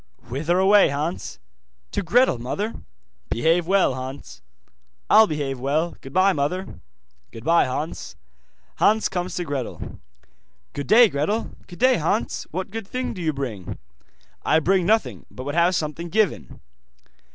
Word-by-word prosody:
'Whither 155 +8 0
away, 195 +2 +5
Hans?' 150 +5 -4 0.5
'To - - -1
Gretel, 205 - +3
mother.' 200 - -3 0.6
'Behave 165 +7 +1
well, 195 -7 +3
Hans.' 130 - -8 0.7
'I'll 220 +1 +8
behave 140 -5 -3
well. 150 +6 -1
Goodbye, 185 +8 +2
mother.' 180 +6 -3 0.5
'Goodbye, 165 +9 +2
Hans.' 150 +5 -5 0.6
Hans 215 +1 +3
comes 180 0 -3
to 175 - -2
Gretel. 140 -6 -5 0.7
'Good 140 -2 -5
day, 235 +2 +7
Gretel.' 200 +8 -2 0.2
'Good 175 - -11
day, 255 0 +4
Hans, 185 +8 -1
What 185 +3 -5
good 225 -2 -6
thing 255 +3 -3
do 185 - -7
you 160 -2 +1
bring?' 125 -10 -5 0.7
'I 155 - +3
bring 185 +2 +2
nothing, 220 +1 0
but 130 - -9
would 145 +2 -4
have 170 +2 +3
something 165 +2 -3
given. 215 -1 -1
170 Hz, 140 wpm, -23 LUFS, 140-195 Hz, 0.7 s, I'll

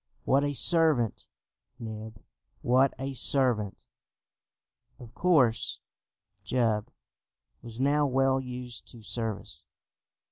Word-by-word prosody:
What 135 +2 +3
a 145 0 -1
servant, 155 - +2 0.5
Neb, 110 -1 -8 0.4
what 130 +2 +3
a 135 +1 -4
servant!" 120 -6 +2 1.2
Of 120 -1 -12
course 140 -11 +2 0.7
Jup 110 -1 0 0.7
was 115 0 -9
now 145 +2 +2
well 135 0 +2
used 125 -1 -8
to 115 -2 -13
service. 110 -1 -5
125 Hz, 95 wpm, -28 LUFS, 115-135 Hz, 1.2 s, What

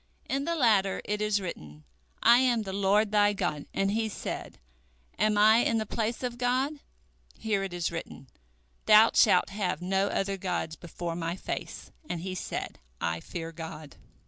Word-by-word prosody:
In 275 +1 -1
the 335 - -1
latter 210 -9 +2
it 210 0 -2
is 210 -1 +1
written, 75 - -8 0.4
I 235 +2 +7
am 245 -4 +2
the 190 -2 -6
Lord 200 +2 +2
thy 205 -1 +4
God, 175 -7 -3
and 195 0 0
he 220 +1 0
said, - - -6 0.6
Am 215 -1 +2
I 215 +2 +6
in 230 -1 +2
the 220 - -1
place 225 +3 -2
of 245 -1 -4
God? 260 +4 0 0.6
Here 215 -3 -1
it 195 -1 -4
is 175 -2 -2
written, 165 -5 -7 0.6
Thou 215 +1 +8
shalt 190 -3 +4
have 190 -5 -2
no 190 +2 0
other 195 0 -1
gods 180 -4 -3
before 170 +1 -6
My 165 0 -3
face, - - -6 0.2
and 170 - -3
he 185 +1 -4
said, 185 - -5 0.2
I 80 0 -1
fear 165 - -6
God. 160 -2 -9
200 Hz, 170 wpm, -28 LUFS, 175-220 Hz, 0.6 s, Thou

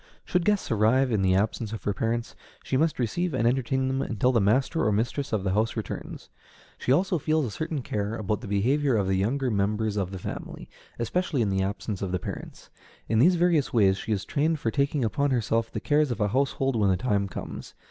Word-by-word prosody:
Should 180 -1 0
guests 205 -8 +1
arrive 115 +5 +3
in 105 -3 +1
the 95 -1 +3
absence 105 +2 -1
of 110 - -6
her 100 - 0
parents, 115 +4 -2 0.3
she - - -2
must 155 +3 +2
receive 150 +7 -1
and 115 -2 +2
entertain 130 +1 +1
them 135 0 0
until 125 +2 +1
the 115 -4 +2
master 130 +10 +2
or 110 - +2
mistress 120 +7 -1
of 105 -4 0
the 95 -1 0
house 110 +3 +1
returns. 110 - -6 0.5
She - - -1
also 175 +4 +2
feels 155 0 +1
a 115 - -4
certain 155 +3 -3
care 105 0 -2
about 105 -1 -2
the 115 - -7
behavior 130 +7 +2
of 100 - +1
the 95 - 0
younger 125 +7 0
members 105 +1 0
of 95 -3 -1
the 95 - -6
family, 90 - -7 0.3
especially 140 +2 0
in 105 - 0
the 95 0 0
absence 100 +1 -3
of 95 -2 -2
the 90 - +1
parents. - - -8 0.4
In 110 0 +2
these 175 +9 +5
various 170 -4 +2
ways 100 -5 +4
she 110 - -5
is 100 -3 -1
trained 155 +2 +1
for 115 - -1
taking 140 -1 +1
upon 140 +6 0
herself 115 -2 0
the - - -3
cares 150 0 +2
of 120 - -3
a 105 -1 +1
household 135 +2 0
when 105 -3 +2
the 95 - +2
time 100 -1 0
comes. - - -8
115 Hz, 225 wpm, -26 LUFS, 105-140 Hz, 0.5 s, these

